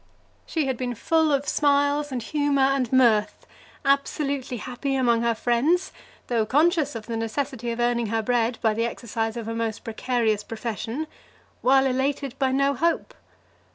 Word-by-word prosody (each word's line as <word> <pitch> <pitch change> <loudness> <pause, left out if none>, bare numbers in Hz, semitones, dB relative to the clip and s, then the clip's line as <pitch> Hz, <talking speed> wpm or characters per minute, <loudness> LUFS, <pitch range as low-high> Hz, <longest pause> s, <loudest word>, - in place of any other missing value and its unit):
She 315 -3 -1
had 265 -2 -1
been 245 -1 -3
full 320 +6 +2
of 280 0 0
smiles, 285 0 +2
and 245 -3 -3
humour, 290 0 +1
and 270 -3 +1
mirth, 235 -5 +3 0.4
absolutely 275 -2 0
happy 255 +4 -3
among 240 -3 +2
her 235 -1 +1
friends, 285 +12 +1 0.3
though 235 -3 +1
conscious 295 - +2
of 220 -2 -6
the 230 - -4
necessity 240 +2 -3
of 230 0 -3
earning 240 -1 +1
her 225 +1 -1
bread 235 0 +1
by 220 -1 +3
the 230 +2 0
exercise 225 -1 -3
of 230 -2 -5
a 225 - -3
most 230 -2 -3
precarious 225 -2 0
profession, 225 - -4 0.6
while 265 +1 +4
elated 270 +1 -1
by 265 -2 +2
no 275 +1 +2
hope. 335 +5 0
250 Hz, 160 wpm, -25 LUFS, 230-280 Hz, 0.6 s, while